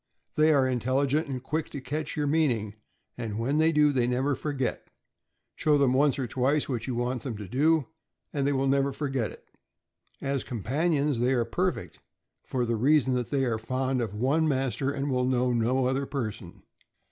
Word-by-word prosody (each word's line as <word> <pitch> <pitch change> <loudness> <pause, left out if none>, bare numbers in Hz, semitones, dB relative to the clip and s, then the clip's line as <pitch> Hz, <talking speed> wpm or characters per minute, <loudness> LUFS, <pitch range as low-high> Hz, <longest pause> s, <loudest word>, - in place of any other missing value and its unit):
They 155 +1 +4
are 140 -3 +4
intelligent 130 +5 +1
and 130 -2 -5
quick 155 +3 -2
to 140 - -6
catch 150 +5 -4
your 150 - +1
meaning, 135 -9 +1 0.5
and 110 -3 -4
when 135 +7 0
they 160 +1 +4
do, 150 -1 +4
they 125 -3 +1
never 130 +3 +1
forget; 140 -2 -3 0.7
show 150 -1 +3
them 135 -3 +3
once 140 +2 +3
or 135 - -1
twice 130 +5 +1
what 120 -3 -3
you 125 - -2
want 120 +1 -1
them 115 -3 -5
to 105 -2 -7
do, 150 - +2 0.5
and 140 -1 0
they - - +2
will 135 -1 +1
never 135 0 +2
forget 135 -6 -2
it. - - -14 0.7
As 135 -1 -2
companions 140 - 0
they 125 +2 +2
are 120 -3 +1
perfect, 180 +10 -2 0.4
for 125 -2 -1
the 115 -1 0
reason 135 +2 +3
that 125 -1 -1
they 135 -2 +1
are 115 -3 -1
fond 130 +2 -1
of 105 -3 -3
one 140 +8 +2
master 135 -1 0
and 140 0 -2
will 125 -1 +1
know 125 -1 +1
no 125 +3 +1
other 130 +2 0
per 120 -7 -2
son. 90 -5 -13
135 Hz, 195 wpm, -27 LUFS, 125-145 Hz, 0.7 s, They